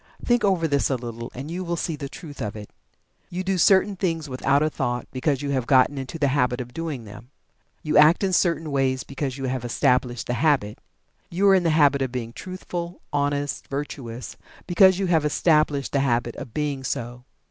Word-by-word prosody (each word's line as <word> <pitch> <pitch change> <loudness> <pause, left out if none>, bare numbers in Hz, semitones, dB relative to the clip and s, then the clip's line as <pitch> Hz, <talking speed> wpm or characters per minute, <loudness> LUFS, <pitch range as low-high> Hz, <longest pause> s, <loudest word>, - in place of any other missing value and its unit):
Think 240 0 +2
over 185 -5 +2
this 140 -2 +1
a 135 - +1
little 115 -1 -6
and 135 +5 -6
you 180 +2 -3
will 170 -1 -2
see 165 -1 -2
the 140 -2 -6
truth 145 -3 -10
of 105 -2 -4
it. 105 -1 -9 0.6
You 180 +1 -4
do 190 -1 0
certain 195 +3 +4
things 165 -4 -2
without 140 +2 +1
a 155 - +2
thought, 125 -3 -2
because 135 +1 -1
you 140 - -2
have 130 -3 -1
gotten 135 +1 +4
into 135 +5 -6
the 145 -3 +2
habit 125 -3 +1
of 125 -1 -7
doing 155 -5 -4
them. 105 +4 -12 0.5
You 150 - +3
act 155 +6 +6
in 190 -1 +1
certain 165 -4 +1
ways 130 -1 0
because 140 -1 -4
you 135 - -4
have 130 -1 -2
established 120 0 +1
the 120 - -2
habit. 130 -5 +1 0.5
You 190 +4 +1
are - - +7
in 190 - +4
the 170 - +1
habit 145 -3 +4
of 130 -2 -1
being 120 -2 -5
truthful, 175 +1 -6
honest, 145 -1 -1
virtuous, 130 -4 -6 0.3
because 190 +1 +5
you 195 - 0
have 165 -4 +2
established 150 -2 +2
the 140 - +1
habit 120 -3 0
of 120 - -8
being 145 0 -2
so. 120 0 -4
140 Hz, 205 wpm, -24 LUFS, 125-165 Hz, 0.6 s, are